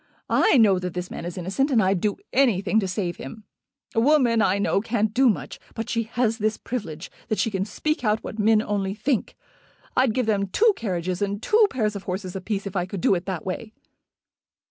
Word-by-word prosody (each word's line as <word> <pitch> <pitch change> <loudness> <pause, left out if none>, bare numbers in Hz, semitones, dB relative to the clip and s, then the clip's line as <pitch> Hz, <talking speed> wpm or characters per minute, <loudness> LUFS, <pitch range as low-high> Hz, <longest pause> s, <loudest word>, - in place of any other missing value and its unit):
I 440 - +4
know 205 -6 +5
that 180 -1 -5
this 180 0 -4
man - - -6
is 175 +1 -6
innocent, 195 - 0
and 250 -5 +3
I'd 190 -3 +2
do 210 -1 0 0.2
anything 220 -5 +3
to 195 - -1
save 180 -2 -3
him. 215 +11 -9 0.5
A - - +2
woman, 245 -3 +4
I 195 -2 +2
know, 200 0 +1
can't 220 -1 0
do 260 +2 +5
much; 150 - -3 0.2
but 225 - -4
she 230 -1 -1
has 235 -2 +1
this 215 +1 0
privilege, 180 -9 -6 0.2
that 215 - -1
she 205 +4 0
can 190 -1 -1
speak 305 +6 -2
out 215 -1 +1
what 220 - -7
men 215 +1 +4
only 200 -2 -2
think. 235 +2 -1 0.6
I'd 255 -4 +3
give 255 -2 +1
them 200 -2 +1
two 435 - +3
carriages 180 -4 -3
and 200 0 -1
two 425 - +4
pairs 215 -5 -1
of 200 - -7
horses 185 0 -4
a 190 - -4
piece 200 +1 -3
if 200 - -6
I 180 -1 0
could 195 0 -5
do - - +4
it 175 0 -2
that 185 -4 -4
way." 215 +4 -5
210 Hz, 220 wpm, -24 LUFS, 190-230 Hz, 0.6 s, know